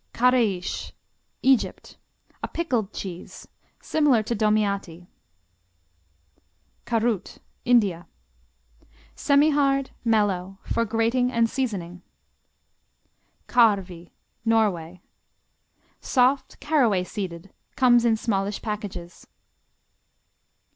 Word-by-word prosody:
Kareish 230 -7 +1 0.5
Egypt 265 -2 +1 0.4
A - - -3
pickled 245 - -2
cheese, 180 -3 -8 0.3
similar 285 -8 +2
to 235 - -2
Domiati. 200 -5 0 1.8
Karut 225 -4 -1 0.3
India 205 -8 +2 1.1
Semihard; 280 -2 +2
mellow; 195 -5 0
for 230 - -1
grating 230 +3 +1
and 230 -2 +2
seasoning. 195 -9 -4 1.5
Karvi 195 -7 +2 0.3
Norway 185 -7 0 1.0
Soft; 260 +1 +1
caraway 245 -12 +2
seeded; 185 -2 -7 0.2
comes 240 -2 +5
in 230 -2 +3
smallish 205 -2 -1
packages. 205 -5 -6
220 Hz, 70 wpm, -24 LUFS, 190-245 Hz, 1.8 s, comes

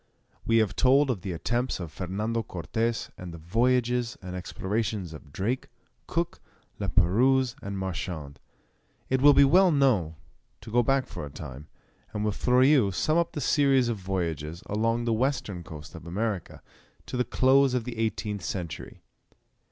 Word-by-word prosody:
We 115 - +4
have 110 -4 +2
told 135 +1 +4
of 105 -7 -4
the 95 - -4
attempts 120 +9 -1
of 85 -4 -6
Fernando 105 +7 -2
Cortes 115 +4 -2
and 90 -2 -7
of - - -10
the 80 - -18
voyages 120 +3 +1
and 90 -2 -7
explorations 95 0 -3
of 75 -2 -12
Drake, 105 - -2 0.4
Cook, 170 +1 -2 0.4
La - - -2
Perouse, 125 +7 +3
and 100 0 -5
Marchand. 85 -6 -5 0.7
It 130 0 +2
will 145 0 +7
be 140 - +8
well 180 +6 +6
now 120 - +2 0.5
to 110 - -10
go 120 +2 +4
back 135 +2 +2
for - - -7
a 75 - -6
time, 70 0 -9 0.5
and 105 0 -2
with 105 -1 0
Fleurieu 130 -2 +4
sum 155 - +1
up 170 - -1
the 150 - -4
series 135 -3 +3
of 115 - -1
voyages 85 -4 -3
along 115 +3 0
the 115 - +1
western 110 -7 -1
coast 75 -2 -10
of 80 0 -10
America, 100 +1 -3 0.4
to - - -6
the 125 - +2
close 130 +2 +3
of 125 - 0
the 115 -1 -6
eighteenth 105 -2 -2
century. 90 -5 -6
110 Hz, 165 wpm, -27 LUFS, 90-130 Hz, 0.7 s, be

